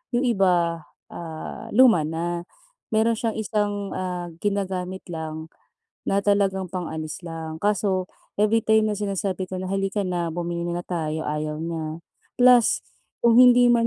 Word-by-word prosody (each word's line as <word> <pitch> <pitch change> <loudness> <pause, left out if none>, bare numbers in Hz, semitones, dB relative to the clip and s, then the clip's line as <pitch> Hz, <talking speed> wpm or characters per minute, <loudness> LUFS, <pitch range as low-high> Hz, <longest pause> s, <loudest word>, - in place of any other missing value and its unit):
'yong 245 - +2
iba, 180 -8 +2 0.3
ah, 160 -2 -7
luma 225 -11 +6
na. 170 +2 -3 0.5
Meron 225 +1 +3
siyang 225 -2 -1
isang, 205 -2 -1
ah, 180 -2 -4
ginagamit 190 -2 -2
lang, 160 -1 -6 0.5
na 195 - +1
talagang 200 -2 +1
pang-alis 165 -2 -5
lang, 160 -1 -6
kaso, 195 -3 +1 0.2
every 215 +2 +3
time 220 -1 +3
na 205 - -2
sinasabi 195 -2 -2
ko 185 - -7
na, 185 0 -4
"Hali 195 0 0
ka 205 +1 -1
na, 175 -2 -1
bumili 170 0 -3
muna 175 0 -2
tayo", 160 -3 -3
ayaw 150 0 -2
niya. 165 0 -4 0.3
Plus, 245 -2 +5 0.4
kung 235 0 +6
hindi 245 -1 +7
man 230 -1 +3
185 Hz, 145 wpm, -24 LUFS, 170-210 Hz, 0.5 s, hindi